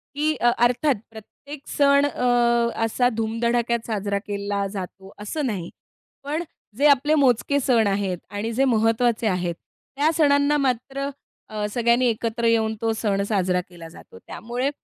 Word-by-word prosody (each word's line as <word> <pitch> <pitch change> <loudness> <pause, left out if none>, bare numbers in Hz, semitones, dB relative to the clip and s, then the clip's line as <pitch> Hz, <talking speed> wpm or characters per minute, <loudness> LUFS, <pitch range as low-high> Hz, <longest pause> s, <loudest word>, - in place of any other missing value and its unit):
की 305 +1 0 0.2
अर्थात 250 +4 +2 0.2
प्रत्येक 275 +6 -12
सण 280 0 +3
अ, 250 -3 -1 0.6
असा 245 +2 +1
धूम-धडाक्यात 235 +1 0
साजरा 200 -2 -2
केला 200 0 -2
जातो 190 0 -8
असं 275 +8 -3
नाही, 190 -8 -3 0.5
पण 305 +4 -2 0.3
जे 290 +2 +4
आपले 290 +2 +4
मोजके 280 +1 +2
सण 235 -5 +2
आहेत 195 -2 -1
आणि 205 +3 -4
जे 265 +4 +2
महत्त्वाचे 225 0 +2
आहेत 180 -3 -1 0.4
त्या 300 +3 +2
सणांना 285 -1 +3
मात्र 275 +1 -1 0.4
अ, 210 -1 -3
सगळ्यांनी 240 +2 +2
एकत्र 230 +1 -2
येऊन 220 -1 +2
तो 225 0 +1
सण 205 -3 -1
साजरा 185 -3 +1
केला 170 -2 -11
जातो. 95 - -15
त्यामुळे 245 +4 -3
230 Hz, 140 wpm, -23 LUFS, 205-275 Hz, 0.6 s, जे